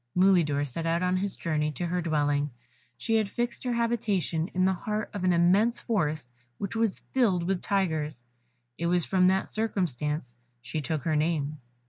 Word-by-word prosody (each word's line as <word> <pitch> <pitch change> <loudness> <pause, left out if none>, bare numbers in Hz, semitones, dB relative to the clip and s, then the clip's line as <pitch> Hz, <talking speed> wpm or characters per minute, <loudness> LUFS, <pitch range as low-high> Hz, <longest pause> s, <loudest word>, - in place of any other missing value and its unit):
Mulidor 170 -7 +4
set 165 +5 -4
out 170 +2 +1
on 180 0 +2
his 195 +1 -2
journey 155 -2 -1
to 175 - -3
her 180 +1 -1
dwelling; 145 -3 +1 0.5
she 225 -1 +1
had 215 -2 0
fixed 240 +2 -3
her 250 -1 0
habitation 210 -8 0
in 185 -2 0
the 190 - +3
heart 210 +4 -3
of 200 -3 -4
an 185 - +4
immense 190 +7 +3
forest 155 - -1 0.3
which 200 +2 -4
was 225 -3 0
filled 205 -10 +2
with 185 +1 -1
tigers 160 - -1 0.6
it 170 - 0
was 175 -1 +2
from 185 -1 +3
that 190 +1 +2
circumstance 150 - -2 0.2
she 125 +6 -4
took 150 0 -2
her 160 -2 +1
name. 150 -1 0
175 Hz, 175 wpm, -28 LUFS, 155-200 Hz, 0.6 s, Mulidor